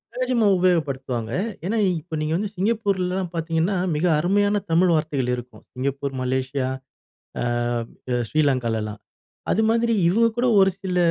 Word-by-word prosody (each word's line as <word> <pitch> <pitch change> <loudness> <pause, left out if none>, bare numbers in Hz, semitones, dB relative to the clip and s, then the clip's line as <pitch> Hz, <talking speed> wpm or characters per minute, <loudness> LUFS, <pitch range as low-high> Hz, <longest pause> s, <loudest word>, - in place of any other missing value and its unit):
தேஜும 250 -4 +2
உபயோகப்படுத்துவாங்க. 135 -10 0 0.3
ஏனா, 215 +5 0
இ - - +3
இப்ப 160 +1 -7
நீங்க 155 +1 -1
வந்து 205 +2 -2
சிங்கப்பூர்லலாம் 190 -3 0
பாத்தீங்கன்னா, 165 +3 0 0.2
மிக 155 +4 0
அருமையான 205 +4 +2
தமிழ் 175 +2 +4
வார்த்தைகள் 145 -5 -1
இருக்கும் 120 -3 -10
சிங்கப்பூர், 140 +1 -2
மலேசியா, 130 +1 -1 0.7
அ - - 0 0.7
அ 125 - +1
ஸ்ரீலங்காலலாம். 115 -8 0 0.5
அதுமாதிரி 230 +2 +2 0.2
இவங்க 230 +6 +4
கூட 245 - +2
ஒரு 190 0 +5
சில 185 -2 -3
165 Hz, 130 wpm, -23 LUFS, 130-200 Hz, 0.7 s, ஒரு